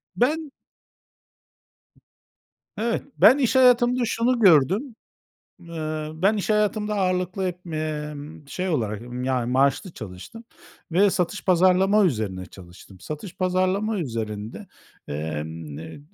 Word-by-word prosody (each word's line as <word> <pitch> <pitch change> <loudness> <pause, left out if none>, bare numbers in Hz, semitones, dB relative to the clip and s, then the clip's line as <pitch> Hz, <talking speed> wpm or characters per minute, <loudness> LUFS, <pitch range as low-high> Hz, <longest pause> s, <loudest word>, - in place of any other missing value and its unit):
Ben 300 +5 +1 2.3
Evet. 230 +2 -1
Ben 255 +6 +7
iş 265 -2 +1
hayatımda 250 -1 +5
şunu 235 +2 +1
gördüm, 195 - +4 0.6
eee, 155 -2 -5
ben 195 +7 +2
iş 205 - -2
hayatımda 210 0 +1
ağırlıklı 185 -1 0
hep, 180 0 -6
emm, 150 -2 -5
şey 185 +4 -3
olarak, 110 - -1 0.2
yani, 125 -2 0
maaşlı 140 +7 +2
çalıştım 110 - -10 0.5
ve 195 +4 +4
satış 180 +3 -2
pazarlama 185 +3 +4
üzerine 105 - -1
çalıştım. 90 +1 -15
Satış 155 - -7
pazarlama 185 +3 0
üzerinde, 110 - -5 0.4
emm, 75 0 -5
n 80 - -9
175 Hz, 110 wpm, -24 LUFS, -, 2.3 s, Ben